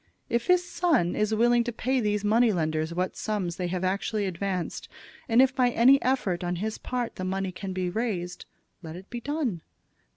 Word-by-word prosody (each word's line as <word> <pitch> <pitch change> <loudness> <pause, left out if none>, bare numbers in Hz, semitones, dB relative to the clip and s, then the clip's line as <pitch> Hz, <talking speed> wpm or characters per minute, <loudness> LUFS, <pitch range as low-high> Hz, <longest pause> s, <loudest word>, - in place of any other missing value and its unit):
If 235 0 0
his 360 0 +3
son 315 - +1
is 215 0 0
willing 240 +2 +4
to 240 - -3
pay 255 +3 0
these 210 -2 0
money 225 +2 +4
lenders 160 -3 -1
what 180 +2 -2
sums 195 -6 -2
they 180 - -2
have 180 +1 -3
actually 200 +3 -1
advanced, 185 -1 -3 0.4
and 235 +3 +6
if 265 -1 +2
by 250 -3 +3
any 255 +4 +5
effort 200 -9 0
on 175 0 -1
his 215 +5 -3
part 245 -2 -3
the 185 - -4
money 190 0 -2
can 190 +1 -6
be 185 -1 -2
raised, 180 -3 -3 0.4
let 160 -2 -8
it 185 +2 -12
be 240 -1 -5
done. 275 - -2
210 Hz, 195 wpm, -27 LUFS, 180-240 Hz, 0.4 s, and